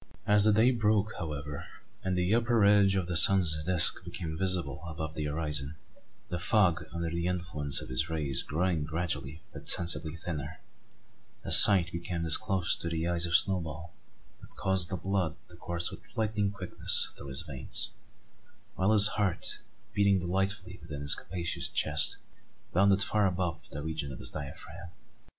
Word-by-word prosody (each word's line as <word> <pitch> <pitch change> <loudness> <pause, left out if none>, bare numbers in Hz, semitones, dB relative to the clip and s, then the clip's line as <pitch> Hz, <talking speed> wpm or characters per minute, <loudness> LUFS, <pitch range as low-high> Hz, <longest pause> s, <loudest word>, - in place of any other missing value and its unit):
As 105 0 +5
the 110 - +4
day 115 +4 +3
broke, 110 -2 -1
however, 75 -3 -7 0.4
and 95 -1 -2
the 90 +3 0
upper 115 -2 +1
edge 100 -1 +3
of 95 -2 -2
the 90 - -4
sun's 85 -3 +5
disk 90 -2 0
became 80 -2 -7
visible 85 -5 -2
above 80 -1 -7
the 75 -1 -5
horizon, 75 -1 -4 0.5
the 90 - -5
fog 85 -5 0
under 85 -1 -5
the 85 +1 -3
influence 85 -6 -2
of - - -11
his 65 +5 -3
rays 75 -5 -1
growing 85 0 -2
gradually 80 -1 -5
but - - -10
sensibly 85 -2 -1
thinner, 80 -3 -7 0.8
a - - -7
sight 95 -3 +11
became 85 0 -5
disclosed 95 +2 +2
to 85 - -4
the 80 0 -4
eyes 85 0 +1
of 85 - -1
Snowball 80 -4 -1 0.5
that - - -17
caused 95 -2 +2
the 95 - -4
blood 90 -3 -3
to 90 - -12
course 85 0 -2
with - - -11 0.2
lightning 105 -2 -1
quickness 95 -3 0
through 70 - -11
his 65 +4 -2
veins; 70 -5 -4 0.8
while 95 +3 0
his 105 -1 +8
heart, 100 -5 -3 0.3
beating 100 -1 +2
delightfully 95 +2 -4
within 70 -1 -9
his 70 - +5
capacious 85 -3 -4
chest, - - 0 0.6
bounded 100 +2 +2
far 105 -1 0
above 90 -3 -5
the 75 - -8
region 75 -3 -5
of 65 - -9
his - - -7
diaphragm. 80 +4 -10
85 Hz, 165 wpm, -28 LUFS, 80-95 Hz, 0.8 s, sight